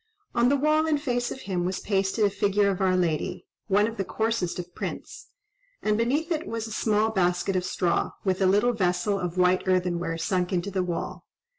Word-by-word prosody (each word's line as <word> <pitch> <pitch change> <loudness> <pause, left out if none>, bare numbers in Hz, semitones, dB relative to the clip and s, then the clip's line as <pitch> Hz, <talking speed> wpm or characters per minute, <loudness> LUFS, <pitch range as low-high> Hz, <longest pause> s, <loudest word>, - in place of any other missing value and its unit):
On 240 0 +3
the 280 - +4
wall 305 +3 +2
in 310 -2 +2
face 245 -4 -1
of 265 - -7
him 180 -3 -2
was 185 +1 -2
pasted 195 +1 +1
a 200 - +2
figure 200 0 +2
of 190 - -4
Our 185 -1 +3
Lady—one 180 +4 -1
of 225 +1 -4
the 195 - 0
coarsest 220 -3 -1
of 175 -1 -7
prints—and - - -6
beneath 275 +10 0
it 320 0 -1
was 230 -1 -3
a 225 - -8
small 215 +1 +1
basket 180 -1 +1
of 180 - +1
straw, 180 -1 0
with 190 -1 0
a 190 - +4
little 210 +6 +3
vessel 195 0 0
of 180 -1 -4
white 185 +1 +3
earthenware 180 -2 0
sunk 180 +2 -1
into 185 +2 -1
the 190 -1 0
wall. 180 0 -4
195 Hz, 195 wpm, -26 LUFS, 180-225 Hz, -, the